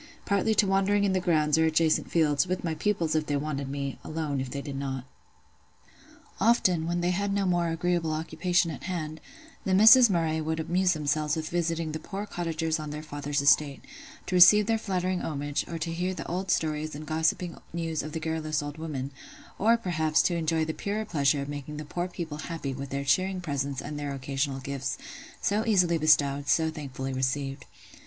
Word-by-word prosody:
partly 205 +2 +1
to 210 - +4
wandering 195 +1 +2
in 195 -2 +2
the 185 - +2
grounds 155 -3 +2
or 160 - +4
adjacent 160 0 +2
fields, 150 -1 +2
with 185 +1 -2
my 165 -2 -1
pupils 165 -1 0
if 155 -1 0
they 145 - 0
wanted 140 -1 -3
me, 140 -1 -4
alone 155 -4 -2
if 130 - -4
they 140 - -4
did 140 -1 -6
not. 135 -2 -4 1.3
Often, 185 -6 +3
when 175 +1 -1
they 175 +1 +1
had 200 +2 -1
no 200 0 +1
more 175 -2 +1
agreeable 165 0 0
occupation 165 +2 0
at 145 - -8
hand, 160 -4 -4 0.4
the 185 - +1
Misses 225 +4 +8
Murray 165 -3 0
would 160 +1 -2
amuse 180 +3 +2
themselves 150 -1 0
with 160 -1 -4
visiting 165 -2 -1
the 155 - -4
poor 200 +4 -5
cottagers 165 -4 -2
on 155 -1 -5
their 150 +1 -6
father's 145 -1 -2
estate, 140 0 +3 0.4
to - - -5
receive 185 +4 +8
their 225 +1 +1
flattering 185 -3 -1
homage, 145 -1 -3
or 170 - -5
to 165 +1 -3
hear 180 +2 -2
the - - -6
old 185 +2 -3
stories 155 -2 0
or - - -6
gossiping 160 +3 -1
news 165 -2 -2
of 155 +1 -7
the 165 - -2
garrulous 155 -2 -2
old 145 +1 -7
women; 140 -4 -4 0.5
or, 230 +3 +4
perhaps, 160 -7 +1
to 175 - +1
enjoy 160 -1 0
the 160 - -3
purer 210 +5 -3
pleasure 140 -6 +1
of - - -7
making 145 +1 -6
the 150 - -6
poor 175 +4 -3
people 165 -4 -6
happy 155 -4 -4
with 135 +1 -6
their 140 0 -3
cheering 185 +7 +1
presence 140 -5 -2
and 145 +1 -5
their 145 -1 -3
occasional 135 0 -2
gifts, 135 0 -3 0.4
so 210 +2 +1
easily 180 -6 +3
bestowed, 145 -2 +3
so 160 +3 +2
thankfully 135 -3 -5
received. 135 +1 -2
160 Hz, 195 wpm, -28 LUFS, 145-180 Hz, 1.3 s, Misses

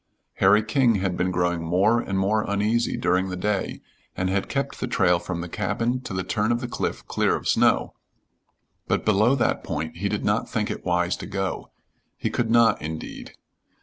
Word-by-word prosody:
Harry 105 +3 +5
King 115 +1 +3
had 95 -2 -1
been 90 +1 0
growing 90 -1 0
more 95 +8 +3
and 95 -4 -3
more 100 +3 +2
uneasy 105 +3 +1
during 95 +2 +1
the 90 - -3
day, 100 +1 -2 0.4
and 95 0 0
had 95 0 -1
kept 140 0 -2
the 130 - -2
trail 95 -8 +3
from 85 -1 -4
the 85 - -5
cabin 120 +8 -1
to 130 - -8
the 95 0 -2
turn 105 +4 0
of 120 - +1
the 120 - -4
cliff - - -3
clear - - +1
of - - -5
snow, - - +3 0.9
but - - 0
below 110 +5 +4
that 125 - 0
point 80 +2 -4
he 100 +3 -1
did 105 - -2
not 105 +2 0
think 105 -2 -1
it - - -6
wise 90 0 +1
to - - -8
go: 95 -1 -3 0.5
he - - -2
could 115 -2 -1
not, 115 -1 +4
indeed. 80 +1 -7
100 Hz, 195 wpm, -24 LUFS, 90-115 Hz, 0.9 s, Harry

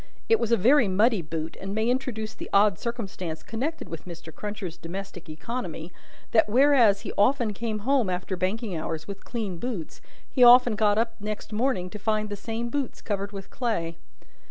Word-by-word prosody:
It 450 -1 +4
was 230 - -1
a 235 - +5
very 245 +4 +5
muddy 210 +2 +3
boot, 160 0 -5
and 195 +1 -4
may 220 +1 +1
introduce 245 -4 -1
the - - -8
odd 200 -3 +4
circumstance 195 -9 -4
connected 280 +9 -3
with 165 +2 -8
Mr. 165 -2 -9
Cruncher's 205 -5 -5
domestic 180 0 -7
economy, 170 -1 -5 0.4
that, 220 -2 +4
whereas 240 -4 +5
he 210 - -6
often 235 0 +3
came 220 +1 -3
home 265 -6 +3
after 180 +1 -2
banking 190 +3 -2
hours 160 0 -4
with 200 -1 -7
clean 210 -8 -4
boots, 210 -9 -5 0.3
he 255 - +2
often 245 -1 +8
got 210 -1 +3
up 230 0 +1
next 210 +1 -5
morning 225 -5 0
to 210 - -7
find 215 0 0
the 205 - -3
same 225 +3 -4
boots 275 0 -3
covered 200 -1 -3
with 195 -2 -8
clay. 170 -10 -2
210 Hz, 180 wpm, -26 LUFS, 185-235 Hz, 0.4 s, often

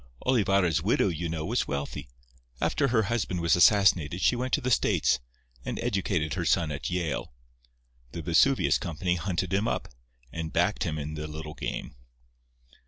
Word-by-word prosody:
Olivarra's 100 - +2
widow, 100 - +2
you 85 0 -3
know, 80 -1 -3
was 120 +5 0
wealthy. 70 -2 -4 0.5
After 140 - +1
her 115 -3 +2
husband 100 -5 -1
was 85 -1 +3
assassinated 90 -4 +4
she 125 - +3
went 125 +1 -3
to - - +4
the 130 0 -1
States, 65 - +2 0.4
and - - -4
educated 85 -6 -1
her - - -2
son 80 -3 +1
at 70 -1 -4
Yale. 85 -3 -2 0.8
The 85 - -6
Vesuvius 90 - +3
Company 85 -1 -2
hunted 90 0 -2
him 100 +3 +1
up, - - -2 0.4
and 80 -1 -5
backed - - +1
him 80 - -2
in 75 +1 -5
the 75 0 -5
little 75 0 -7
game." - - -5
85 Hz, 165 wpm, -27 LUFS, 80-100 Hz, 0.8 s, assassinated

